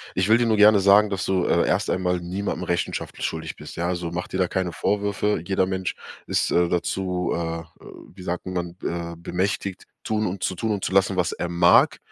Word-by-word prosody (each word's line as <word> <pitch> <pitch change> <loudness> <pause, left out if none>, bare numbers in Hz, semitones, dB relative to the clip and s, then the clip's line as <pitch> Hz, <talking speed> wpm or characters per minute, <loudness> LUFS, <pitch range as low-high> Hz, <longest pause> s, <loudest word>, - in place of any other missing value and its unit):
ich 95 +2 +1
will 110 +2 +5
dir 120 - +2
nur 110 -1 +2
gerne 105 0 +7
sagen, 100 +2 +5
dass 95 -1 -2
du, 95 -2 +1
äh, - - +2
erst - - +1
einmal 90 -1 0
niemandem 90 +1 -3
Rechenschaft 85 -1 -3
schuldig 80 0 -3
bist, - - -10
ja. 85 +1 -1
Also, 85 -2 -2
mach 85 +1 -4
dir 95 - -4
da 90 - +3
keine 90 -1 -2
Vorwürfe. 105 +1 0
Jeder 95 -1 +1
Mensch 95 -1 -2 0.3
ist, - - 0
äh, 85 0 +3
dazu, 90 +1 -1
äh, 85 -1 -3 0.5
wie 90 - -10
sagt 90 0 -4
man, 90 -2 -4
äh, 85 0 -3
bemächtigt, 95 +2 -3 0.2
tun 110 0 0
und 95 0 -4
zu 95 - -1
tun 110 +5 -2
und 100 -2 -2
zu - - -1
lassen, 95 0 +3
was 90 -2 +1
er 90 - -3
mag. 85 0 +4
90 Hz, 215 wpm, -24 LUFS, 85-100 Hz, 0.5 s, gerne